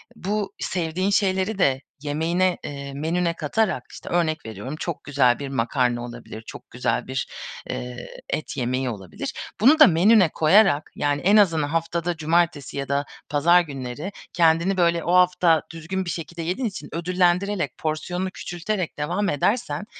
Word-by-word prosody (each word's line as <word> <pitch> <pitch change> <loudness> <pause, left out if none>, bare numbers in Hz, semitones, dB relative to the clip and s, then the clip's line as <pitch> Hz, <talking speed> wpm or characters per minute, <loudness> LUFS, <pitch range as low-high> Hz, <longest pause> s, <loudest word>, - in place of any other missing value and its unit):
bu 200 0 -3
sevdiğin 180 +2 -1
şeyleri 195 +1 +1
de 135 -6 +3 0.2
yemeğine, 165 +5 0
eee, 140 -1 -6
menüne 170 +4 0
katarak, 190 +6 0
işte, - - -10
örnek 160 -4 0
veriyorum 110 +6 -6
çok 170 -3 -4
güzel 130 -4 +2
bir 140 - -4
makarna 120 -1 0
olabilir, 120 -2 -9
çok - - -10
güzel 120 - -1
bir, 130 0 -2 0.4
eee, 125 -1 -5 0.2
et 155 - -3
yemeği 130 +1 -1
olabilir, 95 -6 -6 0.3
bunu 295 +7 +6
da 305 - +10
menüye 185 +2 +5
koyarak, 160 -1 +4
yani, 145 0 0
en 205 +3 +5
azından 165 -7 +4
haftada 165 +1 -1
cumartesi 160 -3 0
ya 140 -1 -4
da 140 0 0 0.2
pazar 170 +5 +5
günleri 140 +3 -6 0.2
kendini, 170 +3 +3
böyle, 170 -2 +2
o 175 - 0
hafta 180 -3 +4
düzgün 175 +4 -4
bir - - -4
şekilde 170 0 -5
yediğin 185 +9 -1
için 190 -7 -7
ödüllendirerek, 180 -1 0
porsiyonunu 175 +4 -2
küçülterek 175 +1 -4
devam 175 +7 -1
edersen, 210 - 0
165 Hz, 150 wpm, -23 LUFS, 145-185 Hz, 0.4 s, da